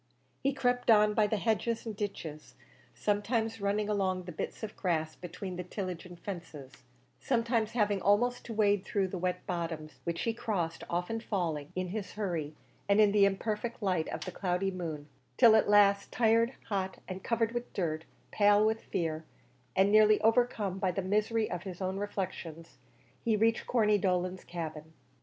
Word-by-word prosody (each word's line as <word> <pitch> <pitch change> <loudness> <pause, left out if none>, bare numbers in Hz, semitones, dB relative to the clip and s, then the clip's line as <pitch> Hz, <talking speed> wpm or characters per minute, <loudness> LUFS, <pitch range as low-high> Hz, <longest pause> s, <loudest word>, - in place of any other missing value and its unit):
He 275 - +2
crept 245 -3 0
on 210 -1 +6
by 210 -1 +3
the 215 - 0
hedges 225 +2 0
and 220 -2 -4
ditches, 170 -7 -6 0.4
sometimes 220 +2 0
running 205 +1 0
along 190 -3 0
the 180 - -7
bits 170 - -5
of 215 - -5
grass 160 -4 -1
between 180 +1 -7
the 180 - -3
tillage 180 -1 -5
and 175 -1 -12
fences 165 -10 -8 0.4
sometimes 230 -3 0
having 205 -4 +1
almost 240 +5 +2
to 230 - -5
wade 205 -2 +3
through 200 -4 0
the 185 - -4
wet 180 0 -2
bottoms 160 -5 -4
which 170 +2 -2
he 230 - 0
crossed, 185 -8 -2
often 180 +6 -1
falling, 165 -10 -2
in 185 0 -2
his 200 0 -5
hurry 170 -8 -3 0.3
and 200 +1 +5
in 210 -1 +6
the 205 -1 +5
imperfect 210 +3 -2
light 180 -5 +1
of - - -5
the 185 - -5
cloudy 185 +1 -1
moon, 160 -5 -5 0.3
till 225 -2 +8
at 220 - +3
last, 200 -1 +5
tired, 230 +1 +3
hot, 190 -2 -2
and 185 +1 -6
covered 230 -1 +1
with 240 0 -4
dirt, 160 -4 -2 0.3
pale 205 0 +5
with 220 +1 +1
fear, 160 -2 -2 0.5
and 195 +1 +4
nearly 215 0 +6
overcome 225 -4 +2
by 190 -2 +1
the 180 +2 -2
misery 215 +3 +1
of 175 - -3
his 185 -3 -7
own 190 0 -2
reflections, 185 -5 -5 0.4
he 225 -3 +2
reached 225 +1 +2
Corney 210 -4 +3
Dolan's 185 -1 -1
cabin. 160 -2 -6
200 Hz, 175 wpm, -31 LUFS, 180-220 Hz, 0.5 s, till